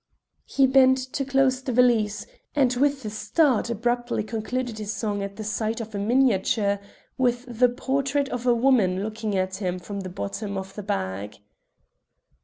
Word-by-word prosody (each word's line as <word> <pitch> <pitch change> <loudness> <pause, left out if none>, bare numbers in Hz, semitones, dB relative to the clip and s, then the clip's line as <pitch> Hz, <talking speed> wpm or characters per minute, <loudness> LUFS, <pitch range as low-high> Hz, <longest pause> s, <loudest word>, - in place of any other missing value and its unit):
He 270 - +3
bent 260 0 +5 0.2
to 275 - -1
close 270 -1 +2
the 260 - -3
valise, 230 -4 +2 0.3
and 260 -4 +3
with 275 0 +1
a 210 - -3
start 250 +2 +1
abruptly 240 0 -1
concluded 225 +1 -3
his 210 -1 -3
song 210 -2 -2
at 200 0 -5
the 215 - -6
sight 220 +1 -2
of 225 -1 -7
a 200 - -3
miniature 205 -3 +2 0.4
with 245 -1 +1
the 245 +1 +3
portrait 275 +3 -1
of 250 0 -4
a 240 - +5
woman 225 -7 +3
looking 215 -1 -3
at 185 0 -1
him 185 -2 -2
from 200 +3 -6
the 185 -1 -5
bottom 195 - -4
of 190 0 -6
the 210 - -6
bag. 100 - -3
225 Hz, 170 wpm, -25 LUFS, 200-255 Hz, 0.4 s, bent